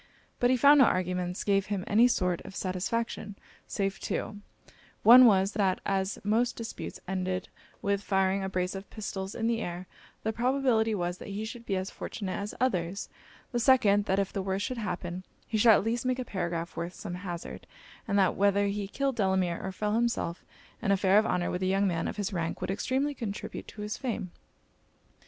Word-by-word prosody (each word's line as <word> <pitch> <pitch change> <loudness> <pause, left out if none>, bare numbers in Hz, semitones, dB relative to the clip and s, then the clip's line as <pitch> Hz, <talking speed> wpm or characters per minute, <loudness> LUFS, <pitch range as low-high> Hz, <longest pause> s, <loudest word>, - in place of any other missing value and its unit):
But 245 - +3
he 255 - +4
found 285 +3 +7
no 265 - +8
arguments 180 -1 -1
gave 195 -1 +2
him 200 -2 -2
any 225 +4 +5
sort 180 -7 0
of 195 - -11
satisfaction, 205 +3 -2 0.3
save 195 -1 -2
two; 205 - -3 0.6
one 245 +2 +10
was, 195 -2 +4
that 195 -4 +1
as 195 0 0
most 230 +4 +1
disputes 230 -1 -6
ended 185 0 -2 0.3
with 200 0 +1
firing 195 -1 +1
a 190 - -2
brace 180 -1 -1
of 195 0 -7
pistols 195 -3 -5
in 225 - -2
the 230 0 +1
air, 175 0 -5 0.4
the 220 - -1
probability 240 -2 +2
was, 175 -1 -2
that - - -9
he 205 +2 -4
should 230 +1 -8
be 195 - 0
as 185 +1 -3
fortunate 195 -4 -5
as 205 +1 -4
others 190 -7 -1 0.4
the 240 - 0
second, 220 -5 +4
that 190 - +1
if 195 -1 0
the 195 - -1
worst 190 +1 -1
should 255 -2 -4
happen, 180 -3 -4 0.2
he 225 - -5
should 225 +1 +7
at - - +3
least 230 +2 -1
make 255 0 0
a 255 - -3
paragraph 170 -5 -3
worth 170 +2 -4
some 195 -4 -6
hazard: 180 -2 -6 0.4
and 200 -2 +1
that 190 -2 +4
whether 200 0 +3
he 200 0 -2
killed 270 +5 -1
Delamere, 190 -5 +1
or 190 - -3
fell 210 +2 -2
himself, 230 -7 0 0.4
an 205 -4 +1
affair 195 +1 +5
of 220 - +1
honour 175 -1 0
with 180 - -3
a 185 - +1
young 195 +1 +2
man 165 -3 -1
of - - -5
his 205 0 -2
rank 170 -2 -2
would 185 +1 -2
extremely 265 +8 0
contribute 215 -6 -6
to 210 - -8
his 210 +1 -3
fame. 220 -8 -3
200 Hz, 200 wpm, -29 LUFS, 185-225 Hz, 0.6 s, one